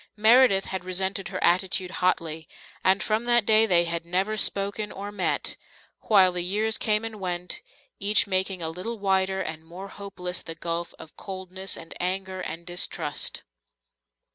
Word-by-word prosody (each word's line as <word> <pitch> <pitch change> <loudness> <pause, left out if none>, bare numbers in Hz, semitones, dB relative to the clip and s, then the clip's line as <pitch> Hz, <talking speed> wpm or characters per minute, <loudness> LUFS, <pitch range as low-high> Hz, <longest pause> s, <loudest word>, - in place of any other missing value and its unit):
Meredith 220 -2 +6
had 190 -2 -5
resented 190 +1 -2
her 185 0 -4
attitude 185 +1 +1
hotly, 165 -3 0 0.3
and 190 +2 +4
from 220 +2 0
that 240 -2 +4
day 220 +1 +5
they 175 -3 +4
had 170 0 -3
never 190 +5 0
spoken 200 +1 0
or 200 +1 -6
met, 195 -3 -1 0.5
while 190 -4 +6
the 180 0 -1
years 210 +5 +1
came 215 0 +1
and 220 -2 -6
went, 180 -1 -3 0.4
each 205 +1 +4
making 190 -2 0
a 160 - -1
little 220 +8 -5
wider 190 -1 +1
and 160 0 -5
more 180 +4 -9
hopeless 185 -3 -5
the 165 - -7
gulf 170 +1 -4
of 160 - -13
coldness 190 0 -4
and 165 - -9
anger 185 +1 -2
and 165 +1 -6
distrust. 175 0 -1
190 Hz, 160 wpm, -26 LUFS, 180-205 Hz, 0.5 s, Meredith